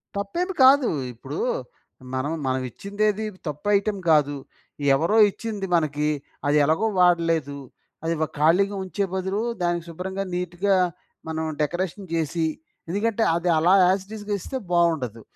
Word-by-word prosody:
తప్పేమి 345 - -2
కాదు. 265 0 +6 0.2
ఇప్పుడు 120 - -7 0.8
మనం 135 +4 -1 0.2
మనమిచ్చిందేది 200 - -1 0.2
తప్పు 150 +6 -5
ఐటెమ్ 200 -1 -2
గాదు. 145 -2 +3 0.6
ఎవరో 170 +10 +1
ఇచ్చింది 210 -3 -5
మనకి 150 -2 0 0.4
అది 145 +1 +3
ఎలాగో 160 +9 +2
వాడలేదు. 165 -5 +2 0.5
అది‌వ 165 -1 0
ఖాళీగా 180 +7 +3
ఉంచే 195 +2 -2
బదులు 190 +2 -1 0.2
దానికి 175 -1 0
శుభ్రంగా 190 +4 -4
నీట్‌గా 180 +2 0 0.5
మనం 160 0 -2 0.2
డెకరేషన్ 180 +4 -2
జేసి, 165 0 0 0.4
ఎందుకంటే 225 +4 0
అది 175 +1 0
అలా 175 +4 +4 0.2
ఎస్‌టిస్‌గా 205 +2 -5
ఇస్తే 265 - -4
బావుండదు. 160 -10 +1
175 Hz, 115 wpm, -24 LUFS, 160-200 Hz, 0.8 s, కాదు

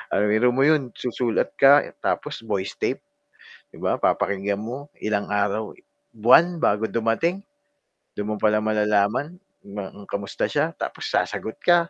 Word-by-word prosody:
Ah, 95 - +1
biro 110 +4 +3
mo 135 +3 +3
'yon, 150 -5 +2
susulat 120 -2 -1
ka 140 +1 +7 0.2
tapos - - -2
voice 100 -3 -3
tape, - - -2 0.7
'di - - -14
ba, - - 0
papakinggan 100 +1 0
mo, 130 +6 -7
ilang 105 -1 -1
araw 105 +1 0 0.4
buwan 160 +11 +5
bago 105 +2 +2
dumating. 115 - 0 0.7
Do'n 105 +1 -4
mo 110 - -1
palang 105 0 +2
malalaman 105 - +1 0.3
na 100 -1 -6
kung 100 - -13 0.2
kamusta 100 - -3
siya. - - 0
Tapos - - -5
sasagot 110 - -2
ka 175 -1 +3
110 Hz, 145 wpm, -23 LUFS, 105-135 Hz, 0.7 s, ka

